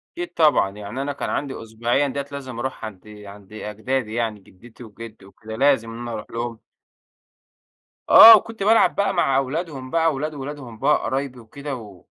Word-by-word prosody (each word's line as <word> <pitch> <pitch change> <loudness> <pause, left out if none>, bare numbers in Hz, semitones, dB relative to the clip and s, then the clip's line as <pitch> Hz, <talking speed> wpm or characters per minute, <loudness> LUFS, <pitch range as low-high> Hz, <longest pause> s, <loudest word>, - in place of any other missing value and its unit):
أكيد 350 0 -6
طبعًا 150 -11 +3
يعني 105 +6 -7
أنا 145 +1 -3
كان 140 - -5
عندي 135 -4 -4
أسبوعيًا 120 +5 -1
ديّة 140 +1 -4
لازم 130 -4 -7
أروح 130 -2 -5
عند 105 -1 -10 0.2
عند 100 0 -14
أجدادي 110 +2 -4
يعني 115 -3 -2
جدتي 115 +6 -16
وجدي 110 -1 -12
وكده 110 +2 -10
لازم 130 -4 +2
إن 115 - -8
أنا 120 0 -6
أروح 110 -2 -6
لهم 115 -1 -5 1.5
آه 225 0 +11
وكنت 225 0 -5
بالعب 225 +3 +4
بقى 200 0 0
مع 140 -7 +2
أولادهم 135 -1 -3
بقى، 165 0 +1
وأولاد 150 +1 -2
وأولادهم 135 -5 -8
بقى 150 - +3
قرايبي 135 -1 -3
وكده 140 +5 -7
وك 105 -6 -13
130 Hz, 170 wpm, -22 LUFS, 110-145 Hz, 1.5 s, آه